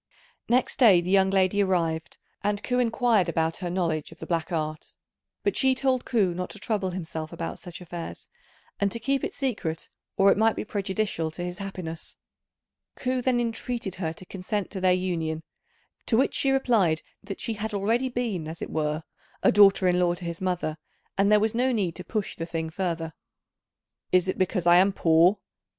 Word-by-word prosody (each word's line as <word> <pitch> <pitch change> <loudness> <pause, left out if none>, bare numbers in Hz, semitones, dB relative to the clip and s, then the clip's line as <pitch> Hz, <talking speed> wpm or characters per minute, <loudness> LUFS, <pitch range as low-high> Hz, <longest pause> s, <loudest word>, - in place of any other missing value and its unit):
Next 255 +2 +2
day 210 -9 +7
the 175 +2 -3
young 190 -1 +5
lady 195 +1 +3
arrived, 165 -4 0 0.3
and 205 0 0
Ku 250 0 0
inquired 230 -5 +2
about 165 0 0
her 180 -2 -4
knowledge 170 -4 -1
of 165 - -13
the - - -8
black 170 +1 -1
art; 155 -2 -3 0.5
but 405 - +1
she 265 -1 +3
told 260 -1 +1
Ku 200 -7 +2
not 180 +1 -4
to - - -7
trouble 205 -2 -1
himself 160 -3 -5
about 165 - -5
such 175 -2 -8
affairs, 175 -1 -7 0.5
and 200 -1 +1
to 230 - -3
keep 275 +3 0
it - - -3
secret 205 - -3 0.3
or 195 0 +6
it - - +2
might 220 0 +4
be - - -4
prejudicial 195 -5 -1
to 160 +3 -6
his 180 0 -5
happiness. 185 -5 -6 0.8
Ku 255 0 -1
then 245 -1 +2
entreated 230 -3 -3
her 160 -2 0
to 185 - -13
consent 195 +2 -3
to 190 - -5
their 185 -1 +4
union, 165 -3 -1 0.6
to 225 - +3
which 265 - +2
she 275 - +1
replied 225 -12 +2 0.2
that 200 -1 -6
she 230 - -2
had 220 +1 -4
already 225 +6 +1
been 230 -10 -2
as 160 +1 -6
it - - -5
were 155 0 -1 0.4
a - - +6
daughter 195 -2 +6
in 180 0 +3
law 175 -1 +2
to 175 0 -8
his 170 0 -5
mother, 180 -4 -1 0.4
and 200 +1 +3
there 210 - +6
was 220 +1 +1
no 250 +3 +2
need 195 -8 0
to 180 - -6
push 205 +3 -3
the 165 - -5
thing 165 -1 -3
further. 165 -2 -2 1.0
"Is 185 0 +4
it 185 - -2
because 185 -1 0
I 175 0 +7
am 195 +2 +4
poor?" 170 +3 +4
190 Hz, 195 wpm, -26 LUFS, 170-220 Hz, 1.0 s, day